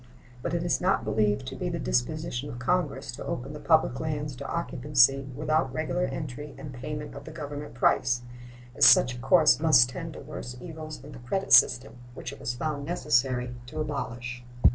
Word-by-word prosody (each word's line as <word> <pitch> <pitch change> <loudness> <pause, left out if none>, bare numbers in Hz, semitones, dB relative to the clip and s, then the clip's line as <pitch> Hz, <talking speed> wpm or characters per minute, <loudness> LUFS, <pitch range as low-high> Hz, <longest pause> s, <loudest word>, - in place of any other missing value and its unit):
But - - -2
it 170 - -1
is 175 - 0
not 185 +2 +2
believed 105 - +1
to - - -6
be - - -3
the - - -3
disposition 60 - -2
of 120 - -7
Congress 135 -1 -1
to 125 - -8
open 135 +4 -4
the 150 - -7
public 160 -5 +2
lands 150 -3 -3
to - - -6
occupancy 135 -4 +2
without 155 -1 0
regular 160 +6 -1
entry 145 -1 -6
and 140 - -8
payment 150 +4 -6
of 140 - -9
the - - -8
Government 145 -4 -7
price, 125 0 +2 0.5
as - - 0
such 125 - +7
a - - -9
course 155 +5 +5
must 140 -6 +5
tend 165 +4 -6
to - - -9
worse 125 -5 -8
evils 155 0 -8
than 145 +3 -11
the 135 - -10
credit 190 +11 -1
system, 125 -1 +5 0.2
which 135 - -6
it - - -12
was 135 -3 -3
found 145 +2 -3
necessary 125 -5 0
to 130 - -7
abolish. 125 -5 -4
140 Hz, 190 wpm, -27 LUFS, 125-155 Hz, 0.5 s, such